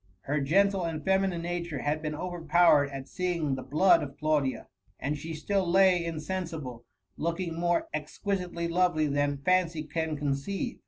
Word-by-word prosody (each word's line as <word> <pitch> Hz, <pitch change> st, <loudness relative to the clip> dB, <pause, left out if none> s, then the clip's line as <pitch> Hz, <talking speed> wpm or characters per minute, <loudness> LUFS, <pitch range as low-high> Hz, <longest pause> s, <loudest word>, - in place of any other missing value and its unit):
Her 145 Hz, +6 st, -1 dB
gentle 195 Hz, +6 st, +3 dB
and 160 Hz, -2 st, -4 dB
feminine 190 Hz, -3 st, +1 dB
nature 170 Hz, -4 st, -3 dB
had 150 Hz, +1 st, 0 dB
been 155 Hz, -1 st, -3 dB
overpowered 165 Hz, -3 st, +3 dB
at 135 Hz, -1 st, -7 dB
seeing 175 Hz, -6 st, -1 dB
the 130 Hz, -, -3 dB
blood 155 Hz, +9 st, +4 dB
of 140 Hz, 0 st, -7 dB
Claudia, 150 Hz, -3 st, 0 dB, 0.3 s
and 145 Hz, +2 st, -1 dB
she 160 Hz, +3 st, -6 dB
still 190 Hz, +3 st, -1 dB
lay 185 Hz, -1 st, +5 dB
Insensible, 160 Hz, -7 st, -5 dB, 0.3 s
looking 170 Hz, +1 st, -2 dB
more 175 Hz, +1 st, 0 dB
exquisitely 170 Hz, +3 st, -3 dB
lovely 170 Hz, -2 st, +2 dB
than 145 Hz, 0 st, 0 dB
fancy 175 Hz, -4 st, +2 dB
can 155 Hz, 0 st, -3 dB
conceive. 145 Hz, -, -2 dB
165 Hz, 150 wpm, -29 LUFS, 150-180 Hz, 0.3 s, lay